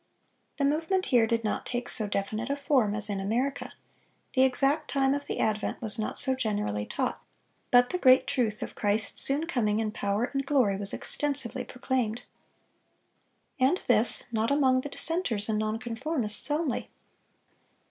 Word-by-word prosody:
The 280 - +1
movement 325 +6 0
here 230 -2 +5
did 230 0 -1
not 215 - -2
take 245 0 -4
so 220 -4 -1
definite 215 +4 -3
a 280 - 0
form 270 -8 +1
as 210 0 -1
in 200 -2 -3
America; 240 +8 -2 0.6
the 260 - +2
exact 275 +4 +1
time 270 -1 +1
of 285 0 -4
the - - -3
advent 215 -1 -1
was 225 0 0
not 215 - -3
so 265 - +6
generally 210 - -2
taught, - - -3 0.5
but 245 0 +4
the 360 - -2
great 255 -4 +5
truth 220 -4 -1
of - - -7
Christ's 205 0 +3
soon 285 +4 +4
coming 220 -9 0
in 220 -1 -1
power 205 0 -2
and 275 0 -1
glory 260 -8 +2
was 200 0 -3
extensively 270 -4 -2
proclaimed. 245 -3 -2 1.4
And 265 +8 +3
this 235 -1 +2
not 225 0 0
among 265 -3 +3
the 290 - -7
dissenters 280 - 0
and 215 -1 0
non 215 0 -1
conformists 235 -1 -2
only. 295 -3 -2
245 Hz, 165 wpm, -28 LUFS, 215-275 Hz, 1.4 s, so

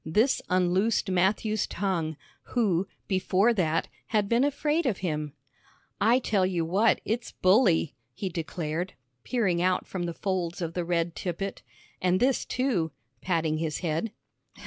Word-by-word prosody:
This 215 - +2
unloosed 185 +3 +2
Matthew's 205 +4 +1
tongue, 170 -5 -2 0.4
who, 195 -5 +2 0.2
before 190 +4 +3
that, 165 -6 +1 0.2
had 210 -2 +1
been 235 +4 +3
afraid 295 +2 +1
of 215 -7 0
him. 150 -3 -2 0.7
"I 225 +4 +5
tell 215 -6 +1
you 180 -3 0
what, 200 +7 +3
it's 225 +1 -2
bully!" 185 - +3 0.2
he 195 - -3
declared, 165 0 -3 0.3
peering 195 -9 +1
out 185 0 +1
from 180 -2 -4
the 170 - -4
folds 185 -3 -2
of 165 -2 -3
the 175 - -1
red 170 -1 0
tippet; 190 +2 -4 0.4
"an' 180 0 +3
this, 255 +5 +2
too," 240 -11 0 0.3
patting 165 -3 0
his 160 -2 -2
head. 165 +7 -1
185 Hz, 145 wpm, -28 LUFS, 170-215 Hz, 0.7 s, I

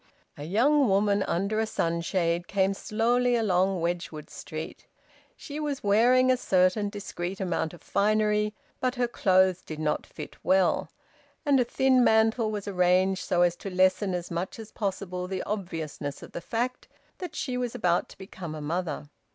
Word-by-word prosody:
A 145 - -7
young 265 - +3
woman 200 +1 +3
under 200 +4 0
a 220 - +1
sunshade 170 -1 -1
came 195 0 +1
slowly 240 +5 +1
along 190 -4 +1
Wedgwood 170 -3 -3
Street. 155 0 -7 0.5
She 295 0 -7
was 295 -3 -3
wearing 245 +5 +4
a 255 - +3
certain 195 -2 +2
discreet 195 -2 -5
amount 175 -4 -1
of - - -18
finery, 210 0 +1 0.2
but 255 0 0
her 245 -1 +1
clothes 185 -5 +3
did 155 - -8
not 155 -1 -1
fit - - -9
well, 190 -1 +2 0.6
and 280 -2 +4
a - - +4
thin 255 +1 +3
mantle 220 0 +3
was 210 -1 -4
arranged 185 0 +2
so 175 -1 +2
as 175 -1 +2
to 195 - -6
lessen 185 +1 +2
as 175 -1 -5
much 170 +2 -3
as 220 -1 -10
possible 185 -3 -3
the 190 0 -3
obviousness 165 -8 -5
of - - -11
the - - -6
fact 245 +6 -3 0.3
that 355 -4 -6
she 255 -4 -3
was 250 -1 -2
about 180 -7 +1
to - - -14
become 185 -4 -8
a - - -6
mother. 155 -1 -3
195 Hz, 165 wpm, -27 LUFS, 175-225 Hz, 0.6 s, wearing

